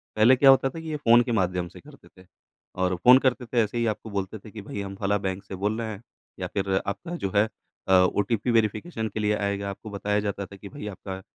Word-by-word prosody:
पहले 110 +4 +6
क्या 135 +1 +6
होता 135 0 +6
था 165 - -8
कि, 160 0 -7
ये 155 - -2
फ़ोन 120 -3 +5
के 120 - -3
माध्यम 90 -4 0
से - - -13
करते 145 -1 -16
थे 90 0 -19 0.6
और 90 0 +1
फ़ोन 125 +8 +7
करते 125 -1 +1
थे 120 +1 -5
ऐसे 105 +3 -4
ही 115 - +1
आपको 110 +1 -8
बोलते 100 +1 -4
थे, 105 +2 -13
कि 105 -1 -8
भई 100 0 -6
हम 100 0 -6
फलाँ 100 +1 0
बैंक 95 0 -3
से 95 - -8
बोल 105 +3 -1
रहे 110 - -3
हैं। 105 -1 -8 0.4
या - - -2
फ़िर 95 -1 -2
आपका 100 - -4
जो 95 - -3
है 105 +2 +4 0.4
अ, 95 - +3
ओटीपी 105 +5 +2
वेरिफ़िकेशन 115 +3 0
के 110 - -3
लिए 105 0 +1
आएगा 100 -1 -2
आपको 105 +3 -8
बताया 105 0 -1
जाता 100 -1 -3
था 100 - -13
कि 100 0 -10
भाई 140 -7 -8
आपका 95 -1 -7
105 Hz, 255 wpm, -26 LUFS, 100-115 Hz, 0.6 s, फ़ोन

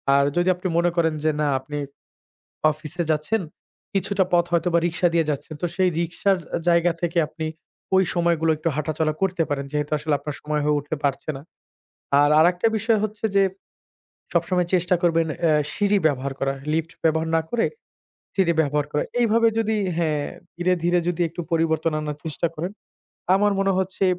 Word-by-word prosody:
আর 140 - +5
যদি 175 +1 +2
আপনি 180 +1 -4
মনে 175 +1 +3
করেন 165 -2 +2
যে, 155 - +3
না, 150 - +2
আপনি 145 +3 -7 1.0
অফিসে 155 +3 -4
যাচ্ছেন, 155 +9 +1 0.5
কিছুটা 195 0 +1
পথ 175 -1 +4
হয়তোবা 170 0 +2
রিক্সা 175 +1 +1
দিয়ে 165 -2 +2
যাচ্ছেন। 150 +2 -4
তো - - +2
সেই 185 -1 +3
রিকশার 180 +3 +1 0.2
আ - - 0
জায়গা 170 0 +4
থেকে 170 0 0
আপনি 160 0 -5 0.5
ওই 190 0 +5
সময়গুলো 170 -2 +2
একটু 155 +2 -1
হাঁটাচলা 155 0 0
করতে 185 -3 +1
পারেন। 140 -1 -2
যেহেতু 150 0 -2
আসলে 150 0 0
আপনার 145 +1 -6
সময় 150 0 -1
হয়ে 150 0 +2
উঠতে 145 +2 -4
পারছে 140 +2 -1
না। 135 - -9 0.8
আর 145 0 +4
আরেকটা 175 +5 +3
বিষয় 225 0 +2
হচ্ছে 215 +1 -6
যে 195 - +6 0.9
সবসময় 180 -2 +1
চেষ্টা 180 0 +3
করবেন 165 -1 +3 0.2
অ্যা 160 -2 +4 0.2
সিঁড়ি 205 0 +2
ব্যবহার 140 -2 0
করা। 135 0 +1 0.2
লিফট 165 +2 -1
ব্যবহার 160 0 +2
না - - +3
করে 235 -1 +1 0.7
সিঁড়ি 185 -4 +3
ব্যবহার 145 -1 0
করা। 150 - +1 0.2
এইভাবে 230 0 +4
যদি 220 -1 +1 0.2
হ্যাঁ, 155 -4 0 0.3
ধীরে, 180 +1 +1
ধীরে 175 0 +3
যদি 175 0 0
একটু 170 +2 -7
পরিবর্তন 160 0 +1
আনার 150 -1 -4
চেষ্টা 160 +2 -1
করেন, 175 +5 -3 0.6
আমার 205 +1 +3
মনে 195 0 +2
হচ্ছে 190 +1 -1
165 Hz, 175 wpm, -23 LUFS, 155-185 Hz, 1.0 s, যে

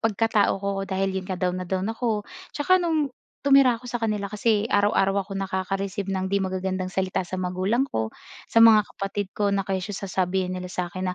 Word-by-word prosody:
pagkatao 225 -1 +2
ko 200 +1 -3 0.2
dahil 195 0 0
'yon 185 - -11
nga 185 - -2
down 180 0 -1
na 185 - -5
down 190 +3 -1
ako. 225 -3 -1 0.3
Tsaka 370 +6 +3
no'ng 315 -6 0 0.3
tumira 270 -4 +6
ako 250 - -13
sa 240 -1 -4
kanila 210 -2 0
kasi 210 +1 +1
araw-araw 200 -2 +2
akong 195 0 -6
nakaka-receive 195 +1 -2
ng 190 -1 -1
'di 200 +1 0
magagandang 185 0 -2
salita 190 0 -1
sa 185 +1 -5
magulang 185 +8 0
ko, 110 - -2 0.4
sa - - +4
mga 225 -2 +8
kapatid 195 0 -4
ko 200 -1 0
na 195 - +1
kesyo 195 +1 -3
sasabihin 185 -1 -1
nila 185 0 -4
sa 180 -1 -4
akin 185 0 -3
195 Hz, 195 wpm, -25 LUFS, 185-220 Hz, 0.4 s, mga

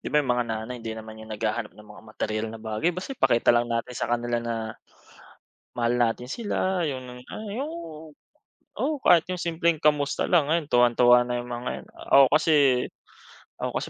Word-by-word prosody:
'di - - -11
ba 150 - +4
yung 130 - -2
mga 120 0 +1
nanay 110 +2 -4
hindi 115 -1 -5
naman 110 0 -10
yun 110 0 -11
naghahanap 110 +1 -2
na 105 - -14
mga 105 0 -14
materyal 110 0 -3
na 115 - -9
bagay, 110 +11 -1
basta 185 +8 -6
ipakita 120 - +3
lang 120 0 +3
natin 115 +1 -2
sa - - -2
kanila 120 0 0
na, 115 0 -3 1.2
mahal 120 +1 +1
natin 120 +1 +1
sila, 190 - -1
yung, 125 -2 -8
ah, 215 -1 -7
yung 280 +7 -3 1.0
oo 305 -1 -1
kahit 175 -9 +5
yung 180 - -3
simpleng 170 -1 0
kamusta 150 -1 +1
lang, 155 -5 +3
ayon 165 -2 +1
tuwang-tuwa 120 -1 +5
na 120 0 -2
yung 120 - -6
mga 120 +1 -4
yun. - - -14
Ako 135 0 +5
kasi 155 +1 +3 1.1
ako - - -2
kasi - - -4
125 Hz, 185 wpm, -25 LUFS, 115-155 Hz, 1.2 s, kahit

